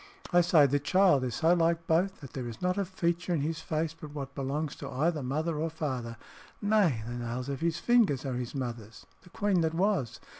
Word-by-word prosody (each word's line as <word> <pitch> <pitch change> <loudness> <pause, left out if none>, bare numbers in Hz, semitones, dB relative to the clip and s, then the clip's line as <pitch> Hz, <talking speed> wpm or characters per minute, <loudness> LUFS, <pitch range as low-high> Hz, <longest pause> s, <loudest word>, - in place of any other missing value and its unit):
I 175 - +7
say 165 -4 +5
the 140 +1 +2
child 180 -2 +4
is 125 -3 -2
so 165 +2 +4
like 165 -1 +1
both, 175 +4 +1
that 140 - -10
there 125 -3 -4
is 115 -1 -7
not 180 0 0
a 200 - 0
feature 175 -1 -1
in 150 - 0
his 160 +2 -2
face 160 -1 -2
but 155 -2 -11
what 140 -1 -5
belongs 140 +2 -3
to 140 - -7
either 150 +5 0
father 155 +5 -1
or 160 +1 -1 0.2
mother 115 -2 -5 0.4
nay, 205 - +2
the 120 - -5
nails 120 +2 -4
of 140 +1 -4
his 165 -1 0
fingers 210 - +3
are 135 - -2
his 125 +2 -4
mother's 120 -4 -6 0.2
the 180 - -17
queen 200 -2 +1
that 160 0 0
was. 185 - 0
155 Hz, 220 wpm, -29 LUFS, 130-175 Hz, 0.4 s, I